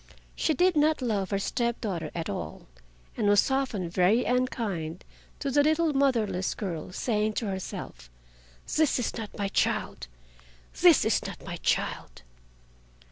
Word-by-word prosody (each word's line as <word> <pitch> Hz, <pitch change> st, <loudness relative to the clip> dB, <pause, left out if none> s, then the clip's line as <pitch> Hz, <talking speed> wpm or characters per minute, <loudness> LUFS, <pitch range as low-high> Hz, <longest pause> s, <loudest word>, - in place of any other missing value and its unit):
She 315 Hz, -, +1 dB
did 360 Hz, +3 st, +3 dB
not 300 Hz, -2 st, +2 dB
love 205 Hz, -5 st, 0 dB
her 200 Hz, -, 0 dB
step 235 Hz, +4 st, -1 dB
daughter 175 Hz, -8 st, -3 dB
at 165 Hz, -1 st, -3 dB
all, -, -, -5 dB, 0.5 s
and 210 Hz, -, 0 dB
was 205 Hz, +5 st, +4 dB
often 260 Hz, -9 st, 0 dB
very 185 Hz, +7 st, +3 dB
unkind 210 Hz, -10 st, -1 dB, 0.3 s
to 275 Hz, -, -3 dB
the 290 Hz, +2 st, +4 dB
little 315 Hz, +1 st, +2 dB
motherless 225 Hz, -9 st, +1 dB
girl, 180 Hz, -5 st, -5 dB
saying 215 Hz, +1 st, 0 dB
to 225 Hz, -, -2 dB
herself: 185 Hz, -, -6 dB, 0.7 s
"This 315 Hz, -2 st, +3 dB
is 245 Hz, -, -2 dB
not 220 Hz, -3 st, -7 dB
my 200 Hz, -, -1 dB
child! 60 Hz, -, -1 dB, 0.7 s
this -, -, +7 dB
is -, -, +2 dB
not -, -, -9 dB
my -, -, -5 dB
child!" -, -, -2 dB
215 Hz, 145 wpm, -28 LUFS, 185-265 Hz, 0.7 s, this